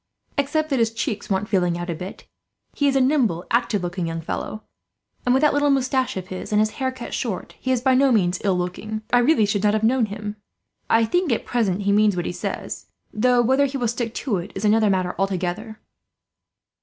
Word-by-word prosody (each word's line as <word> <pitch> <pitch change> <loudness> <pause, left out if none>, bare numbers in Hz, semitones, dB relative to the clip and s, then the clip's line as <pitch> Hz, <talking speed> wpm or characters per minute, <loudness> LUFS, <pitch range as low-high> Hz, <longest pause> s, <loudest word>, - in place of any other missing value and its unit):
Except 305 +2 0
that 270 - +2
his 225 -1 +2
cheeks 225 -2 -3
want 195 +1 0
filling 180 -5 +1
out 175 0 -4
a - - -1
bit, 180 +4 -8 0.5
he 285 - +1
is 275 - +2
a - - +4
nimble, 250 - +2
active 220 -5 +1
looking 175 0 -3
young 165 0 -3
fellow; 215 +6 -5 0.6
and 245 - +5
with 265 - +3
that 300 - +4
little 290 0 +2
moustache 260 -4 +1
of 185 0 -6
his, 185 +2 -6
and 210 - +3
his 215 0 +2
hair 260 0 +1
cut 255 -2 -8
short, 225 -8 -3
he 260 - -1
is 250 -2 +1
by 260 +1 +3
no 270 +1 +4
means 185 -5 +2
ill 195 -3 +2
looking. 215 +5 -4
I 245 - +6
really 245 -3 +4
should 205 -1 0
not 210 0 +3
have 215 - -1
known 235 0 +3
him. 210 0 -6 0.5
I 225 0 +4
think 355 +6 +1
at 230 - 0
present 205 -5 0
he 200 - +2
means 210 -1 +4
what 175 - -2
he - - -2
says, 175 - -5 0.3
though 245 +2 +3
whether 265 +4 +3
he 275 +1 -4
will 245 -2 0
stick 235 0 -3
to 225 -8 -1
it 175 +3 -6
is 195 - -3
another 215 0 +4
matter, 185 -2 0
altogether." 195 +3 -2
220 Hz, 225 wpm, -23 LUFS, 190-255 Hz, 0.6 s, I